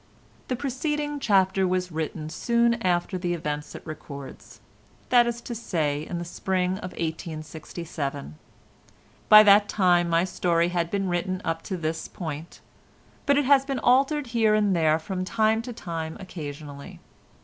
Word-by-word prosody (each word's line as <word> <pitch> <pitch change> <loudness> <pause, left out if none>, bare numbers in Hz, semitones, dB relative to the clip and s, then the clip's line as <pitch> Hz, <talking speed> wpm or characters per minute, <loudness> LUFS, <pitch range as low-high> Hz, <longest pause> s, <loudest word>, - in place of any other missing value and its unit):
The 255 - -1
preceding 290 +3 -2
chapter 190 -4 +3
was 180 0 -1
written 155 0 -4
soon 235 +5 +1
after 180 0 0
the 175 -1 -1
events 150 -2 -4
it - - -10
records—that 155 - -3
is 235 0 -3
to 240 - -6
say 155 -10 -2
in 175 - -4
the 175 - -4
spring 185 +2 -1
of 185 -3 -7
1867. 160 - -5 1.0
By 215 0 +11
that 205 0 +6
time 175 -3 +3
my 165 0 +3
story 175 -2 +1
had 170 -1 -1
been 195 0 -1
written 185 +1 -1
up 165 0 -1
to 185 - -2
this 160 -1 -3
point; 160 -2 -7 0.7
but 280 0 +4
it 290 - +2
has 275 0 +5
been 275 -1 -3
altered 275 +4 +3
here 220 -2 +4
and 205 -3 +2
there 160 -2 +3
from 185 +3 -4
time 220 +2 +1
to 245 +1 -7
time 165 -7 -5
occasionally. 145 -6 -8
180 Hz, 150 wpm, -26 LUFS, 160-220 Hz, 1.0 s, By